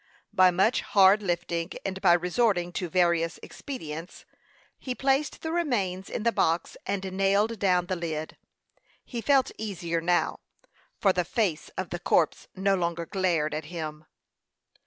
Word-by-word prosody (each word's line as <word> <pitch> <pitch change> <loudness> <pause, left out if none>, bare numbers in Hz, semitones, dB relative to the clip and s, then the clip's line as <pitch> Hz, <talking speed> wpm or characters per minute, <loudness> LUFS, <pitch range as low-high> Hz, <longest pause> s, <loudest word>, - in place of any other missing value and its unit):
By 185 0 +6
much 190 +7 +2
hard 195 +1 +5
lifting, 175 -2 -2
and 190 -1 -3
by 175 -3 +6
resorting 180 0 +1
to 175 0 -3
various 170 -1 +1
expedients, 165 - -8 0.5
he 255 -2 -4
placed 275 +3 0
the 320 - -2
remains 205 - -1
in 220 - -4
the 235 - +3
box 165 -5 0
and 195 0 -1
nailed 200 +3 +2
down 180 -3 +2
the 185 - -2
lid. 160 -3 -4 0.7
He 240 -2 -5
felt 270 0 +3
easier 175 -6 -2
now, 175 +1 +1 0.6
for 195 -2 +4
the 180 - +1
face 180 -3 -1
of 190 -2 -4
the 175 - -3
corpse 170 -3 +1
no 195 +1 +2
longer 170 -2 -1
glared 170 -5 0
at 155 0 -3
him. 155 -2 -6
185 Hz, 150 wpm, -27 LUFS, 170-205 Hz, 0.7 s, By